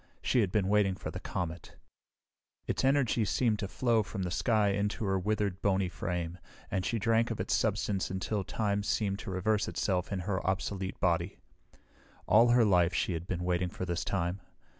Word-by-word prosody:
She 125 - +2
had 100 -4 0
been 100 -2 +1
waiting 100 -2 +3
for - - -6
the - - -6
comet. 85 -2 -5 0.9
Its - - -1
energy 135 -4 +3
seemed 110 0 +1
to 100 - -2
flow 115 +2 +2
from 105 -2 -4
the 90 - -3
sky 110 0 +2
into 100 +2 -1
her 95 -1 +1
withered, 100 -1 -1
bony 95 -2 +1
frame, 90 -1 -4 0.3
and 95 -2 0
she 115 - -1
drank 115 +2 +2
of - - -4
its - - -1
substance 95 -2 0
until 95 +2 -2
time 100 +1 -1
seemed 100 -1 -1
to - - -7
reverse 100 +3 0
itself 90 -2 -1
in 95 -2 -2
her 95 0 -2
obsolete 95 0 -2
body. 85 +1 0 0.9
All 115 +3 +6
her 120 -1 +5
life 90 -3 +3
she 90 - 0
had 85 +2 -5
been 90 -2 -3
waiting 90 0 0
for 90 - -5
this 85 -1 -2
time. 90 0 -2
100 Hz, 185 wpm, -31 LUFS, 90-105 Hz, 0.9 s, All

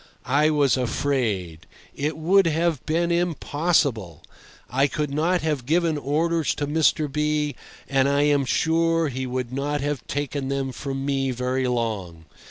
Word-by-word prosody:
I 145 +4 +3
was 145 -4 +3
afraid. 110 - -1 0.3
It 150 +3 -2
would 180 +4 +4
have 165 -2 0
been 170 +2 +1
impossible. 150 - 0 0.4
I 135 +3 +2
could 150 0 -3
not 170 +5 +1
have 150 -6 -2
given 165 0 +2
orders 155 +3 0
to 145 - -2
Mr. 155 +1 +2
B—, 150 0 -1 0.3
and 135 0 +2
I 140 +1 +2
am 145 -1 +3
sure 165 +3 +1
he 130 0 -4
would 125 -1 -3
not 145 +2 -1
have 145 -3 -3
taken 145 -1 -3
them 135 -1 -2
from 135 +1 -5
me 135 -1 0
very 125 +1 -1
long. 105 -9 -3
145 Hz, 150 wpm, -24 LUFS, 130-155 Hz, 0.4 s, would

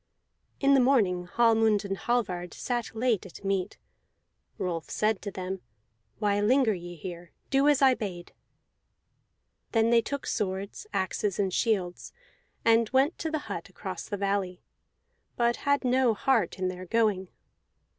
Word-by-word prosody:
In 275 0 +4
the 275 - +6
morning 210 -9 +3
Hallmund 225 -1 +3
and 195 -1 -2
Hallvard 190 -7 -2
sat 240 -2 -3
late 230 -3 +1
at 190 - -13
meat. 195 -2 -1 0.8
Rolf 170 -3 -3
said 215 -1 0
to 205 - -4
them: 190 -1 -5 0.6
"Why 205 -1 +1
linger 240 +1 +4
ye 175 -1 -7
here? 175 +1 -8 0.2
Do 275 +1 +4
as 290 -2 +4
I 265 -1 +7
bade!" 190 -7 -6 1.4
Then 225 0 +3
they 235 -1 +6
took 280 +4 -4
swords, 195 - -3
axes, 190 +1 -1
and 195 -3 0
shields, 190 -6 -1 0.5
and 230 -1 +4
went 270 +5 +2
to 320 - -2
the 310 -2 -3
hut - - -5
across - - -7
the 205 - -2
valley, 195 -2 -1 0.7
but 235 0 +2
had 285 0 +3
no 250 -2 +3
heart 255 -1 +1
in 185 -1 -1
their 185 0 -6
going. 210 -3 +1
210 Hz, 145 wpm, -28 LUFS, 185-245 Hz, 1.4 s, I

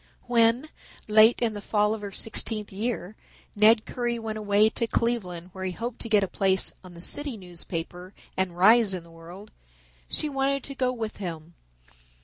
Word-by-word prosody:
When, 240 +4 +3 0.4
late 220 +3 +6
in 225 -2 +1
the 205 - -6
fall 210 +1 +1
of 220 - -5
her 200 -1 -6
sixteenth 215 0 -2
year, 215 -1 -3 0.4
Ned 215 +2 +5
Currie 240 -1 -2
went 220 -1 -5
away 205 0 +4
to 230 - -2
Cleveland 185 -8 -2
where 190 - -7
he 185 -1 -2
hoped 235 +4 -5
to 230 - -5
get 210 -2 +4
a - - -1
place 190 0 +1
on 180 -2 -12
a - - -10
city 285 0 -2
newspaper 180 0 -7 0.2
and 185 -2 -2
rise 210 +1 +6
in 180 - -6
the 170 - -17
world, 175 +5 -12 0.6
she 305 - +1
wanted 275 -1 0
to 275 - -6
go 255 -2 0
with 225 -3 -5
him. 170 -4 -7
215 Hz, 180 wpm, -26 LUFS, 185-235 Hz, 0.6 s, late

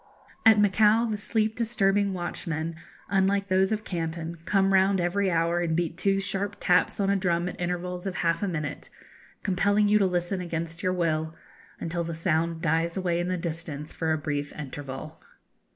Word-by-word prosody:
At 220 -1 +7
Macao 210 +3 +4
the 220 -2 -1
sleep 215 +1 0
disturbing 205 -4 +2
watchmen, 165 -2 -3 0.3
unlike 195 0 +1
those 190 +1 +3
of 215 0 -1
Canton, 165 -2 -4
come 195 -1 +2
round 190 0 +4
every 190 +3 +1
hour 170 0 +1
and 165 -2 0
beat 170 -2 -1
two 195 +2 +1
sharp 200 +1 -2
taps 180 +4 +2
on 195 -1 +2
a - - +3
drum 175 -2 0
at 180 - -6
intervals 180 +1 -3
of 190 - -3
half 165 -1 0
a 205 - 0
minute, 155 -5 -4 0.5
compelling 205 +2 +2
you 210 +1 +4
to 195 - +3
listen 180 +1 -1
against 165 0 -4
your 185 -2 +1
will, 160 -2 -1 0.4
until 170 +1 -2
the 165 0 -4
sound 165 0 0
dies 165 +2 +1
away 175 -2 0
in 175 - -1
the 185 0 -1
distance 160 -3 -5
for 160 -1 -1
a 160 - +2
brief 145 -1 -3
interval. 145 +1 -7
180 Hz, 180 wpm, -27 LUFS, 165-195 Hz, 0.5 s, At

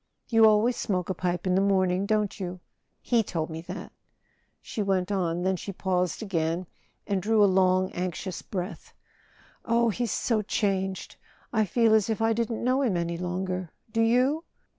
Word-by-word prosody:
"You 225 -1 +6
always 220 +3 +4
smoke 185 -3 -1
a - - 0
pipe 180 -1 -2
in 185 - +2
the 190 - +3
morning, 190 -1 +2
don't 210 -1 0
you? 180 -1 -5 0.4
He 235 -2 +3
told 165 -6 -3
me 160 0 -5
that," - - -7 0.7
she 215 - -5
went 190 -1 0
on; 175 -3 0
then 190 0 +1
she 200 - -6
paused 180 +1 -1
again 170 -2 -1 0.4
and 195 -2 -1
drew 215 +2 +3
a - - +8
long 185 -1 +3
anxious 180 +1 -4
breath. 185 0 -6 0.7
"Oh, 235 0 +2
he's 235 +1 -1
so 225 -3 +1
changed! 195 -3 -2 0.4
I 220 -2 +3
feel 225 +3 +3
as 220 -1 +3
if 220 - -1
I 225 0 +2
didn't 230 0 -2
know 255 +3 +2
him 225 -10 +1
any 170 0 -2
longer—do 185 +4 -3
you?" 255 +7 +3
195 Hz, 170 wpm, -27 LUFS, 180-220 Hz, 0.7 s, a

